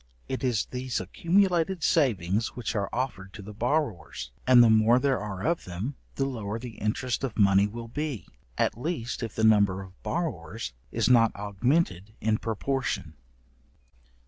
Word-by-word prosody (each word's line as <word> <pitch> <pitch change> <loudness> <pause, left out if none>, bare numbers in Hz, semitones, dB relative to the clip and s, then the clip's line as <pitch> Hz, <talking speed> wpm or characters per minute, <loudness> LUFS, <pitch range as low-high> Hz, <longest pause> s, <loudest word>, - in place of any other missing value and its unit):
It 130 - -4
is 120 -6 +1
these 125 -1 -3
accumulated 175 - +1
savings 110 - +1
which 120 -2 -3
are 100 -2 -1
offered 100 -7 -3
to 105 - -9
the 105 +2 -9
borrowers, 115 - -2 0.2
and 125 -2 +8
the 115 - +6
more 110 +2 +5
there 135 +1 +1
are 100 -2 -5
of 170 +1 0
them, 95 +10 -4 0.2
the 135 - 0
lower 110 -5 -3
the 115 -1 -9
interest 120 +5 -1
of 130 -5 -3
money 100 -1 +5
will 115 +2 -7
be, 145 -1 -4 0.3
at - - +1
least 150 -7 -3
if 115 -3 -5
the 110 - -1
number 100 -3 +4
of 95 0 -16
borrowers 110 - -3 0.2
is - - +1
not 115 -3 +5
augmented 105 - 0
in 110 0 +1
proportion. 115 - -2
115 Hz, 160 wpm, -27 LUFS, 100-135 Hz, 0.3 s, and